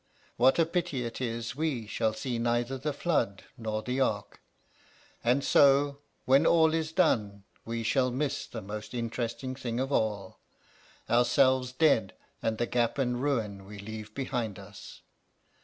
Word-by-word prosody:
What 130 +3 +4
a 165 - +4
pity 160 -7 -2
it 115 - -6
is 115 -1 -3
we 145 -7 -1
shall 110 +1 0
see 120 +2 -3
neither 120 +2 0
the 145 +3 -2
flood 140 - -1
nor 110 -3 -3
the 125 +2 -2
ark! 105 -6 -1 0.8
And 125 +4 +2
so, 140 0 +4 0.3
when 135 +4 +5
all 160 -1 +5
is 160 -1 -1
done, 105 - +1 0.2
we 115 0 -3
shall 130 +3 +2
miss 135 +3 -2
the 115 - -7
most 105 +4 -7
interesting 120 +2 -3
thing 125 -3 -4
of 135 +2 -2
all: 105 -6 -1 0.7
ourselves 125 +2 +3
dead 130 -8 +2 0.3
and 110 -1 -1
the 120 - 0
gap 120 +1 0
and 125 -2 0
ruin 110 -9 -1
we 105 +1 -10
leave 110 +1 -8
behind 120 -7 -2
us. - - -12
120 Hz, 155 wpm, -29 LUFS, 110-135 Hz, 0.8 s, when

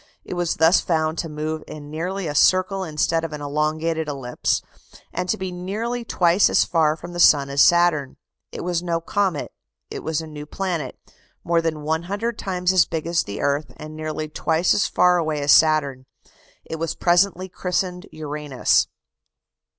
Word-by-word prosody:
It - - -6
was 175 -2 -1
thus 160 +3 +4
found 160 -2 0
to 165 - -3
move 155 +1 -4
in 145 -1 -9
nearly 180 +5 -3
a 150 - -3
circle 185 +5 +3
instead 165 0 0
of 165 -2 -4
an 150 - -6
elongated 155 +2 -1
ellipse, 135 -4 -2 0.5
and 180 0 -3
to 220 - +1
be 190 -2 -4
nearly 215 +7 -4
twice 180 -3 +3
as - - +3
far 155 -2 +2
from 170 +2 -10
the 175 - -5
sun 140 -5 +5
as 140 0 +3
Saturn. 170 -6 +3 0.3
It - - -6
was 175 -1 -1
no 170 -1 -1
comet, 185 -1 -1 0.4
it - - -5
was 160 -1 -2
a 160 - -6
new 150 -1 -9
planet; 170 -7 -3 0.5
more 170 0 +2
than 160 -2 -3
100 190 +9 -2
times 180 -1 0
as 180 -3 +5
big 160 -2 -4
as 170 0 +1
the 100 - -6
earth, 140 -1 0
and 155 0 -9
nearly 155 0 -4
twice 160 +2 +1
as 200 - +2
far 180 0 +3
away 155 -2 -1
as 145 0 +2
Saturn. 140 -5 +3 0.6
It 160 - -5
was 165 0 -2
presently 185 +1 +2
christened 180 0 -3
"Uranus." 150 -3 0
165 Hz, 175 wpm, -22 LUFS, 150-180 Hz, 0.6 s, sun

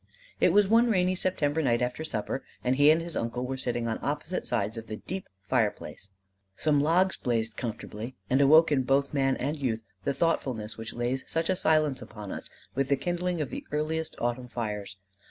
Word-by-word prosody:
It - - +5
was 205 +2 +5
one 230 +3 +5
rainy 185 -3 +3
September 160 -5 0
night 120 -5 +2
after 125 +5 -2
supper, 130 -3 -3 0.2
and 125 +1 +2
he 145 +2 +6
and 160 +2 +4
his 170 -1 -7
uncle 115 +2 -2
were 135 +1 -2
sitting 120 -2 -2
on 110 - -2
opposite 155 +5 -2
sides 110 -2 0
of 115 0 -7
the 110 - -4
deep 190 - -6 0.2
fireplace. 105 -4 -1 0.5
Some 145 +3 +2
logs 180 +5 +3
blazed 115 -3 -1
comfortably, 115 +1 -5
and 130 +5 +3
awoke 155 +3 +7
in 140 -3 +3
both 135 +3 +1
man 135 -2 +2
and 145 +4 -1
youth 115 -5 -1 0.2
the 140 - 0
thoughtfulness 120 -10 0
which 115 +1 -7
lays 120 +2 -1
such 165 +2 0
a - - +2
silence 155 -5 +2
upon 105 -3 -8
us - - -6 0.2
with 135 0 0
the 140 - +3
kindling 175 +3 -1
of 140 - -3
the - - -5
earliest 155 +2 -1
Autumn 120 +1 -2
fires. 105 -5 -4
135 Hz, 195 wpm, -28 LUFS, 120-160 Hz, 0.5 s, awoke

